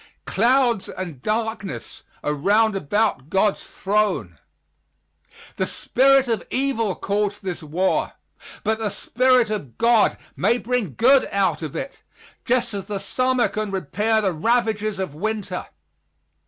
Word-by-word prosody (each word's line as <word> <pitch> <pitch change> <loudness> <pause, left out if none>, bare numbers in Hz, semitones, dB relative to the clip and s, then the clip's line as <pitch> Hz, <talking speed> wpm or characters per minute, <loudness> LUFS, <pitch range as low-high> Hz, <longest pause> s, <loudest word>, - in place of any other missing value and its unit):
"Clouds 240 0 +2
and 170 -9 -7
darkness 220 - -3 0.2
are 150 - 0
round 210 +8 +2
about 195 -4 0
God's 195 +3 +1
throne." 195 - -1 1.2
The - - 0
spirit 270 +1 +3
of 230 -2 -1
evil 240 -7 0
caused 205 0 -2
this 185 -2 -4
war, 165 +5 0 0.5
but 220 +1 0
the 220 -2 -1
Spirit 250 +3 +2
of 145 - -5
God 230 -2 +3 0.2
may 235 - +2
bring 240 - -2
good 260 +3 +5
out 200 -3 +1
of 155 -4 -6
it, 275 - -6 0.4
just 245 -2 +1
as 195 -1 -5
the 205 -2 -3
summer 255 +5 +1
can 215 -1 -3
repair 205 +5 0
the 190 -3 0
ravages 215 +2 0
of 190 -6 -4
winter. 200 +2 -3
215 Hz, 130 wpm, -22 LUFS, 190-235 Hz, 1.2 s, good